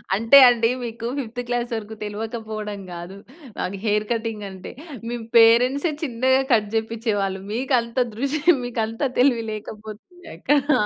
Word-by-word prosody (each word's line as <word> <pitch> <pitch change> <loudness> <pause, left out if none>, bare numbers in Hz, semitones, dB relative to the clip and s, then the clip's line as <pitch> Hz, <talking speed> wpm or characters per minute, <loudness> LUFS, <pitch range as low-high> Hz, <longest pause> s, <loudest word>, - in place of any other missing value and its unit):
అంటే 230 +6 +6
అండి, 230 -1 +2
మీకు 230 0 -5
ఫిఫ్త్ 245 -1 -5
క్లాస్ 245 0 -2
వరకు 220 0 -6
తెలవకపోవడం 215 -1 -5
కాదు, 175 +3 -8 0.4
నాకు 190 +2 -3
హెయిర్ 210 0 +1
కటింగ్ 225 -3 -3
అంటే, 190 -1 -9 0.4
మీ 240 - -3 0.2
పేరెంట్సే 250 +7 +5
చిన్నగా 260 0 +2
కట్ 210 -2 +2
చేపిచ్చేవాళ్ళు. 220 -4 -1
మీకు 260 +2 0
అంత 235 +2 -11 0.2
దృషి 280 +5 -2 0.2
మీకు 235 -2 -3
అంత 225 +3 -8 0.2
తెలివి 245 -3 +3
లేకపోతుంది 215 - -10
అక్క. - - -20 0.3
ఆ! - - +1
225 Hz, 145 wpm, -22 LUFS, 210-245 Hz, 0.4 s, అంటే